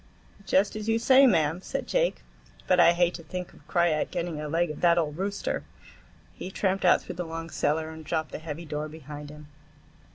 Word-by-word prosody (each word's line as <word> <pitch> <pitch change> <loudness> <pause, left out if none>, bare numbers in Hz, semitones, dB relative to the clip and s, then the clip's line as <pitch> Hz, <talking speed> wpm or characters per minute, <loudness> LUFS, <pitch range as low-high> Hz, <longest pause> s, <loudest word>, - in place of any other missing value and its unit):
"Just 195 +2 +2
as 215 +1 -4
you 225 - +3
say, 265 +3 +6
mam," 160 -4 +2
said - - -4
Jake, - - 0 0.4
"but 180 - +3
I 170 0 +7
hate 175 0 +2
to 170 - -8
think 180 +2 -6
of - - -20
Krajiek 170 -3 +1
getting 170 -3 -3
a 150 - -4
leg 165 +1 +1
of 150 - -9
that 170 -1 +5
old 150 -3 0
rooster." 200 +4 -2 0.7
He - - -7
tramped 190 0 -1
out - - +5
through - - -8
the 180 - -2
long 165 0 -6
cellar 160 +1 0
and 160 0 -10
dropped 160 0 -2
the - - -5
heavy 160 +1 -7
door 150 0 -4
behind 150 -1 -9
him. 150 0 -11
170 Hz, 205 wpm, -27 LUFS, 155-185 Hz, 0.7 s, I